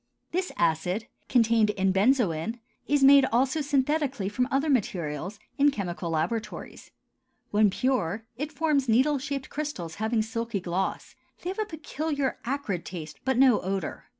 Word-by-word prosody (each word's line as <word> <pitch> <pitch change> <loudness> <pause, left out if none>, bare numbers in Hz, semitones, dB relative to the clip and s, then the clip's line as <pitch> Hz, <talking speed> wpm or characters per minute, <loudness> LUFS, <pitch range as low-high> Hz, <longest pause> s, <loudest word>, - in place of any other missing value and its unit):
This 365 +2 -1
acid, 170 +6 +1 0.2
contained 230 -3 +4
in 195 -2 +1
benzoin, 215 - +2 0.3
is 290 -1 +2
made 275 0 +8
also 265 +5 +1
synthetically 280 -6 0
from 250 +4 0
other 280 +2 +1
materials, 185 - -1 0.2
in 285 +1 +6
chemical 180 -9 -4
laboratories. 165 +8 -3 0.6
When 210 0 +4
pure 220 -3 -1
it 295 +5 -4
forms 295 -4 +1
needle 270 +6 +3
shaped 275 0 -4
crystals 240 - -4
having 220 0 +1
a - - 0
silky 230 -1 -3
gloss; 185 +1 -3 0.3
they 360 - -2
have 390 - -7
a 430 - +1
peculiar 310 -5 -3
acrid 235 - -2
taste, 155 -6 -8
but 265 -2 +1
no 255 -4 +5
odor. 190 -2 -3
235 Hz, 150 wpm, -27 LUFS, 190-280 Hz, 0.6 s, made